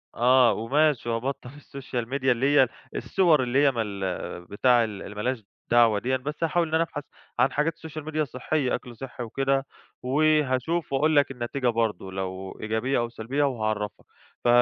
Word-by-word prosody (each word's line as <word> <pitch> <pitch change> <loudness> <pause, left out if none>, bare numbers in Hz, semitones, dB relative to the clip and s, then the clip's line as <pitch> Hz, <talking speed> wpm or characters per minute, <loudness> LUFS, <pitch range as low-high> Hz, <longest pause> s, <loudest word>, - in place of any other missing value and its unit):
آه، 125 -1 +5
وماشي 130 +3 +1
وأبطَّل 125 +2 -3
الSocial 135 -4 -6
Media 130 +2 -4
اللي 130 +4 +2
هي 135 -2 +6 0.3
الصور 165 -8 +3
اللي 130 +3 +2
هي 140 - +5
من 120 -3 -2
ال 95 -4 -4
بتاع 120 +5 +3
ال 105 -3 -5
اللي 105 - -9
ما 105 - -4
لهاش 125 -1 -2 0.3
دعوة 115 -3 +5
ديًّا، 130 +3 0
بس 150 +5 -5
هاحاول 165 +1 +1
إن 155 - -8
أنا 165 - +4
أبحث 145 -3 -6 0.4
عن 130 +2 +4
حاجات 150 +4 0
Social 160 -1 -7
Media 155 0 -1
صحية، 130 +1 -1
أكْل 125 -1 -9
صحي 125 -1 -7
وكده، 135 +3 0 0.4
وهاشوف 150 +2 +1
وأقول 155 +3 +2
لك 145 -1 +4
النتيجة 125 +1 -3
برضو 110 -5 -1
لو 95 0 -5
إيجابية 110 +5 0
أو 120 0 -1
سلبية 120 +5 -2
وهاعرَّفك، 110 -6 -2 0.4
ف - - 0
130 Hz, 175 wpm, -26 LUFS, 115-145 Hz, 0.4 s, هي